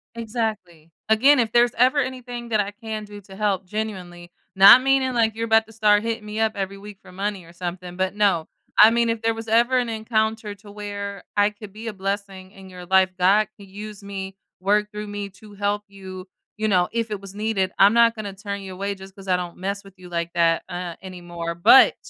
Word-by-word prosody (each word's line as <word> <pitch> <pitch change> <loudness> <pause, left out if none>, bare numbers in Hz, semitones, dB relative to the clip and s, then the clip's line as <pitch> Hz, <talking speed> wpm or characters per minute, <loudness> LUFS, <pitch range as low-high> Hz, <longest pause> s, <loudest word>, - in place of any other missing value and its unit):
Exactly. 215 -8 -4 0.2
Again, 260 +6 +5
if 225 -3 +1
there's 240 0 +4
ever 255 +4 +4
anything 245 -2 -4
that 215 -2 +1
I 205 0 -1
can 215 -1 -6
do 205 0 -11
to 190 0 -14
help, 195 -2 -1
genuinely, 180 -4 -6 0.2
not 200 +6 +9
meaning 270 -1 +2
like 225 -2 +2
you're 230 0 -2
about 225 0 +4
to - - -15
start 210 -1 +3
hitting 230 -1 -3
me 210 +1 -5
up 220 -1 +1
every 195 0 -4
week 200 0 -11
for - - -15
money 195 -1 -4
or 170 - -16
something, 180 0 -6
but 190 +1 -1
no, 200 -6 +2 0.3
I 215 - +9
mean, 235 0 +2
if 230 -1 -1
there 225 0 +1
was 225 0 -8
ever 235 +3 +3
an 245 -2 0
encounter 220 -1 -1
to 205 0 -15
where 200 -1 -6
I 205 +1 +4
could 210 -1 -12
be 225 +2 -8
a 215 - -3
blessing 195 -1 -5
in 195 -2 -14
your 180 -1 -10
life, 190 0 +4
God 200 +4 +4
can 200 -1 -13
use 205 +1 -9
me, 195 -1 -6 0.2
work 210 +2 +1
through 210 0 -6
me 205 -1 -5
to 210 +2 -16
help 205 +1 -1
you, 190 -1 -10 0.3
you 215 0 0
know, 180 -3 +3
if 230 -1 -2
it 205 - -3
was 195 0 -10
needed, 205 -3 -1
I'm 200 +3 +7
not 235 0 +5
gonna 205 -3 -6
turn 200 0 -6
you 190 -1 -8
away 200 +2 -3
just 190 0 -13
'cause 195 -1 -13
I 180 -1 +3
don't 175 -1 -6
mess 200 +2 -4
with 195 -1 -15
you 180 -1 -13
like 170 0 -3
that, 165 -1 +2
uh, 175 -1 -5
anymore, 175 -2 -6
but 175 +10 +7
205 Hz, 225 wpm, -23 LUFS, 190-220 Hz, 0.3 s, not